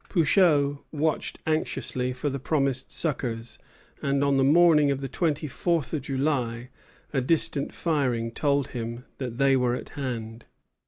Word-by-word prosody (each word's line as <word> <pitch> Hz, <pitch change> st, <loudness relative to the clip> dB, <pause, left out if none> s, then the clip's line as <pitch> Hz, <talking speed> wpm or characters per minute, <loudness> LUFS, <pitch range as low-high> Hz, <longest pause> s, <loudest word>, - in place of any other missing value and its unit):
Pouchot 150 Hz, -5 st, +3 dB
watched 155 Hz, 0 st, -1 dB
anxiously 145 Hz, -5 st, -1 dB
for 125 Hz, +3 st, -4 dB
the 140 Hz, -, -3 dB
promised 135 Hz, -2 st, -1 dB
succors; 120 Hz, -7 st, -3 dB, 0.4 s
and 140 Hz, 0 st, +1 dB
on 140 Hz, -1 st, +3 dB
the 135 Hz, -, +4 dB
morning 150 Hz, 0 st, +5 dB
of 140 Hz, -1 st, 0 dB
the 135 Hz, -, -4 dB
twenty 155 Hz, +2 st, -1 dB
fourth 165 Hz, +2 st, -1 dB
of 155 Hz, -, -1 dB
July 130 Hz, -3 st, -1 dB, 0.4 s
a 135 Hz, -, +2 dB
distant 145 Hz, 0 st, 0 dB
firing 125 Hz, -8 st, 0 dB
told 140 Hz, +1 st, 0 dB
him 120 Hz, +1 st, -5 dB
that 125 Hz, -3 st, -4 dB
they 135 Hz, 0 st, +4 dB
were 125 Hz, -1 st, +2 dB
at -, -, -7 dB
hand. 115 Hz, -4 st, -5 dB
140 Hz, 150 wpm, -26 LUFS, 125-150 Hz, 0.4 s, morning